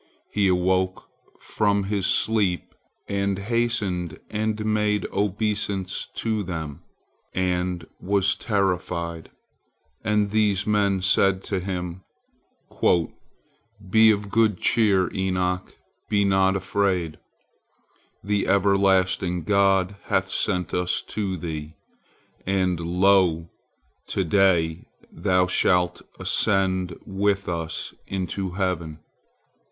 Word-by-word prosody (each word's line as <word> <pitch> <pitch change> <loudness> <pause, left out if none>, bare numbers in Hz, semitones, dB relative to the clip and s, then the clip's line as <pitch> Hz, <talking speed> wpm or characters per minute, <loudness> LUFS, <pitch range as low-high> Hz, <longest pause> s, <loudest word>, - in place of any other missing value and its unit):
He 100 -2 +2
awoke 95 0 +1 0.3
from 100 -2 0
his 100 -1 -1
sleep, 100 -5 0 0.3
and 100 -1 -1
hastened 100 -6 -1
and 110 0 -1
made 105 -2 +1
obeisance 100 -1 -1
to 110 -2 -1
them, 80 -5 -5 0.5
and 90 -2 -1
was 95 0 +2
terrified. 90 -5 -2 0.7
And 105 -1 +1
these 105 -2 +2
men 100 -3 +1
said 95 0 +3
to 95 - -2
him: 90 -1 -4 1.9
"Be 110 +3 +6
of 100 -1 0
good 110 -3 +3
cheer, 100 -4 +2
Enoch, 90 -1 -1 0.3
be 100 -1 +2
not 95 0 +3
afraid; 95 -4 -1 1.0
the 100 0 0
everlasting 95 -3 +2
God 100 0 +2
hath - - 0
sent 90 -2 0
us 90 0 0
to 100 -3 -2
thee, 80 -2 -6 0.7
and 95 -2 0
lo! 90 -1 +2 0.6
to 95 - -1
day 85 -3 +2 0.2
thou 90 -2 +2
shalt 90 -1 +1 0.2
ascend 95 -3 0
with 100 0 0
us 85 -2 -4
into 95 0 -3
heaven. 90 -5 -2
95 Hz, 95 wpm, -24 LUFS, 90-100 Hz, 1.9 s, Be